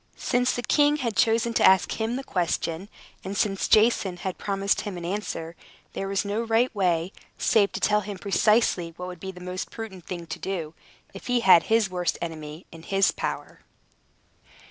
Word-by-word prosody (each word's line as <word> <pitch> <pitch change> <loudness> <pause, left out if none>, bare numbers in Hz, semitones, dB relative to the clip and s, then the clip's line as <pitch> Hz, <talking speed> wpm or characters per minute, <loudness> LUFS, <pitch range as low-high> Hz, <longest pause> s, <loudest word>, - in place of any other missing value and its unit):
Since 250 0 +1
the 245 - -3
king 290 +2 +3
had 240 -7 -2
chosen 230 +1 +2
to - - +2
ask 190 +3 +4
him 225 +2 -1
the 270 - -4
question, 175 -2 -2 0.3
and 195 +1 -5
since 195 -2 0
Jason 215 -4 +3
had 185 0 -5
promised 200 0 0
him 200 -3 -6
an 170 - -6
answer, 170 -3 -4 0.4
there 195 - -3
was 195 +1 -1
no 205 +3 -1
right 230 +2 +1
way 180 -3 0 0.2
save 205 -3 +3
to - - -3
tell 210 0 +2
him 205 -1 -6
precisely 200 -4 +2
what 180 - -6
would 180 -2 -8
be 190 +2 -6
the 180 - -13
most 180 +1 -5
prudent 195 -6 -9
thing 175 -2 -5
to 160 - -6
do, 170 -5 -4 0.4
if 195 - -10
he 245 -1 +2
had 185 -5 +6
his 225 -2 +3
worst 180 -1 -1
enemy 155 0 -7
in 165 - -11
his 195 +3 +2
power. - - -5
195 Hz, 190 wpm, -25 LUFS, 180-225 Hz, 0.4 s, had